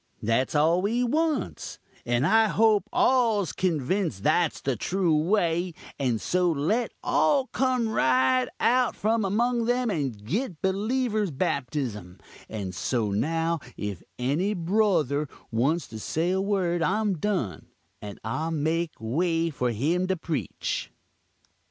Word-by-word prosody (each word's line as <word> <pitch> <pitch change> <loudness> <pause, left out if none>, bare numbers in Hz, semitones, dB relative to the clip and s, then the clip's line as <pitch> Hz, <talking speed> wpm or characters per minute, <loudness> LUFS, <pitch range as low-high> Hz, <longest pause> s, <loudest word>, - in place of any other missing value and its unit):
That's 115 +6 +1
all 160 +4 +3
we 230 +5 +1
wants; 310 +5 -1 0.3
and 120 +2 +2
I 220 +5 +5
hope 215 -2 +3
all's 225 - +2
convinced 165 - -1
that's 160 +1 +2
the 135 -2 -1
true 175 - +1
way 170 0 +1 0.2
and 125 -5 0
so 180 +6 +1
let 170 +11 0
all 255 - +3
come 255 -2 0
right 130 - +2
out 250 +1 +2
from 220 +1 +1
among 235 +4 +1
them 245 -1 +1
and 130 - -3
git 190 - -2
beleevur's 215 +2 0
baptism; 130 - -3 0.3
and 100 -4 -5
so 110 0 -1
now 165 +10 0 0.2
if 100 -4 -4 0.2
any 155 +12 0
brothur 165 - +1 0.2
wants 140 +9 +1
to 110 - -7
say 165 +10 -1
a 190 +1 +1
word 185 -4 0
I'm 200 0 +1
done, 180 - -2 0.3
and 105 -1 -8
I'll 130 +9 -2
make 160 +1 -1
way 165 +8 0
for 125 -3 -1
him 160 - 0
to 190 -1 0
preach." 160 -2 -3
170 Hz, 135 wpm, -26 LUFS, 130-210 Hz, 0.3 s, I